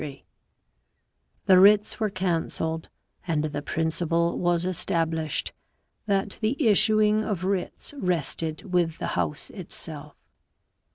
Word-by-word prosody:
Th 140 -3 -8 1.3
e - - +9
wr 185 +2 +9
i 210 - +8
ts 210 - -8
were 215 -1 +1
cancelled, 165 -3 -2 0.4
and 155 -3 0
the 145 -1 -3
principle 165 +2 0
was 175 -1 +1
established 165 -3 -1 0.5
that 195 0 -1
the 225 +6 0
issuing 215 0 +4
of 195 -5 -3
writs 190 +7 -3
rested 165 - -2
with 165 -2 +1
the - - -3
House 85 -4 -2
itself. - - -6
175 Hz, 120 wpm, -26 LUFS, 160-195 Hz, 1.3 s, e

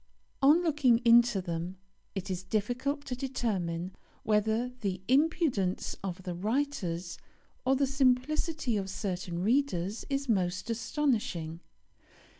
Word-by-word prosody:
On 300 +6 +6
looking 295 -8 +4
into 235 -3 +6
them 170 +2 -4 0.4
it 195 -1 -3
is 180 -1 -2
difficult 245 +9 -2
to 250 - -3
determine 190 -9 -2 0.3
whether 220 +3 +1
the 195 -4 -2
impudence 270 - +1
of 185 -1 -4
the 180 - -4
writers 185 -5 -2 0.5
or 265 +1 +4
the 275 +1 +2
simplicity 270 0 +1
of 195 -1 -3
certain 180 -3 -3
readers 215 -5 +1
is 275 0 -1
most 185 0 0
astonishing. 220 - -1
225 Hz, 115 wpm, -30 LUFS, 185-270 Hz, 0.5 s, On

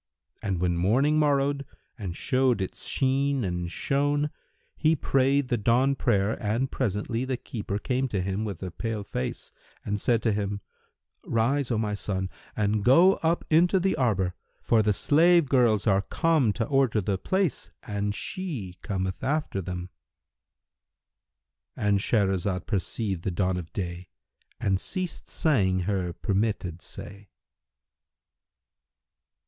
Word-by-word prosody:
And 95 -5 -1
when 85 -1 +1
morning 130 - +3
morrowed 140 -1 +2 0.3
and 95 -8 -6
showed 130 -3 +2
its 95 - -5
sheen 135 0 +1
and 90 -2 -2
shone, 145 +6 0 0.4
he 160 0 +3
prayed 135 -1 +2
the 120 - +1
dawn 125 +6 +3
prayer 105 -5 +1
and 115 +5 0
presently 115 0 -1
the 130 -1 -2
keeper 110 -5 -4
came 130 +4 -1
to 105 -6 -2
him 95 +3 -1
with 100 -4 -5
a 90 - -4
pale 110 +2 -3
face, 65 -9 -4 0.3
and 105 0 -2
said 115 -2 +2
to 115 - +3
him, 100 0 -2 0.6
"Rise, 125 +4 +1
O 115 - +1
my 105 -1 -1
son, 95 -2 -3 0.2
and 105 0 +1
go 170 - +6
up 165 +1 0
into 175 +4 +5
the 190 +1 +1
arbour: 105 -10 +1 0.3
for 115 -2 +3
the 105 0 +2
slave 165 - +4
girls 120 -6 +3
are 100 -3 +4
come 150 +2 +2
to 115 - -1
order 135 -6 +2
the 95 -1 -1
place, 190 - -1
and 100 0 -2
she 130 - -5
cometh 95 -3 -3
after 145 -8 -1
them;"—And 90 +2 -7
Shahrazad 95 -3 0
perceived 95 -1 -2
the 95 - -2
dawn 90 +1 0
of 85 -2 -7
day 90 -2 -5 0.5
and 95 -1 +1
ceased 185 -3 -4
saying 95 - +2
her 90 -2 -1
permitted 95 -2 -1
say. 100 0 -9
110 Hz, 135 wpm, -27 LUFS, 95-135 Hz, 0.6 s, go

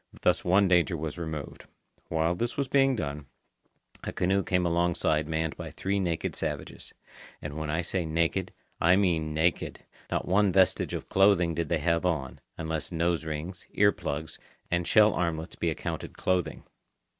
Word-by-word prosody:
Thus - - +3
one 95 +3 +4
danger 90 -1 +3
was 80 +1 -5
removed. 80 -3 -6 0.4
While 80 +1 +1
this 120 +7 -3
was 140 -1 0
being 135 0 +3
done, 75 - -4 0.8
a - - -3
canoe 95 +2 +1
came 90 -1 +1
alongside 85 -3 +1
manned 80 0 -1
by - - -6
three 100 +1 -2
naked 85 -4 -1
savages. - - -5 0.5
And 75 - -6
when 80 -1 -4
I 80 +3 0
say 90 +1 -1
naked, 85 +3 0 0.3
I 90 +2 +5
mean 80 -6 +1
naked. 85 +3 0 0.3
Not - - -2
one 100 +2 +3
vestige 95 0 +3
of - - -6
clothing 95 -3 +4
did 85 -1 -2
they 85 - +2
have 85 +2 +1
on, 80 -8 -1 0.2
unless 80 0 -3
nose 85 0 0
rings, 80 +4 -5
ear 100 0 +5
plugs, 75 -2 -5 0.3
and 85 0 0
shell 110 -1 +6
armlets 85 -1 -2
be 85 - -1
accounted 80 - -5
clothing. 90 -2 -1
85 Hz, 165 wpm, -28 LUFS, 80-95 Hz, 0.8 s, shell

